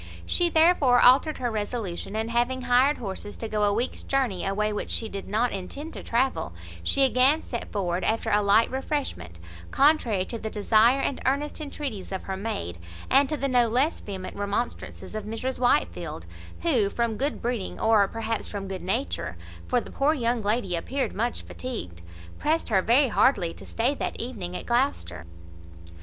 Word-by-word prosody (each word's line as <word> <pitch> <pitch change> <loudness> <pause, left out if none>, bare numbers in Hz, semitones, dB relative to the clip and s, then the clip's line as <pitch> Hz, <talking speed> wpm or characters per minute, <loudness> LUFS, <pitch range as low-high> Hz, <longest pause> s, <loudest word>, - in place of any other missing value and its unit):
She 350 -1 +2
therefore 315 -7 +5
altered 270 +6 +5
her 245 -2 -2
resolution; 210 -3 -4
and, 220 +1 -2
having 240 +2 +1
hired 250 +4 +4
horses 205 -1 -6
to 225 - -4
go 215 -1 -1
a 205 0 +4
week's 235 +5 -1
journey 255 -10 0
a 195 - 0
way 210 +1 0
which 210 - -4
she 225 - -1
did 200 -2 -7
not 225 +4 +1
intend 275 - -6
to - - -7
travel, 240 - 0 0.3
she 275 - +2
again 265 +4 +4
set 235 - -5
forward 180 -3 -1
after 225 +1 0
a 210 - +4
light 205 +3 +4
refreshment, 260 - -3 0.3
contrary 260 -10 +3
to 230 - -5
the 220 - -4
desire 220 +5 +4
and 275 - -2
earnest 290 +4 -1
entreaties 280 -10 -5
of 190 - -4
her 190 - -4
maid, 190 - -4 0.3
and 275 +1 +5
to 305 - -1
the 275 - -1
no 245 -3 +3
less 260 +8 +1
vehement 190 -2 -7
remonstrances 205 +4 -4
of 215 -1 -4
Mrs 225 +4 -3
Whitefield, 255 +4 0 0.4
who, 250 -12 +2
from 235 +1 -1
good 280 +6 -2
breeding, 235 -5 -3
or 215 -3 +4
perhaps 225 +1 -3
from 200 -2 -5
good 190 -1 -5
nature 185 - -2 0.3
(for 245 - +2
the - - -9
poor 295 +3 +2
young 240 -3 0
lady 210 -3 0
appeared 265 +11 -2
much 235 +4 -2
fatigued), 215 - -6 0.4
pressed 315 +2 0
her 195 -4 +3
very 255 +6 +4
heartily 200 -7 +3
to - - -13
stay 240 +5 0
that - - -4
evening 200 -8 -5
at - - -8
Gloucester. 90 - -1
230 Hz, 180 wpm, -26 LUFS, 200-265 Hz, 0.4 s, therefore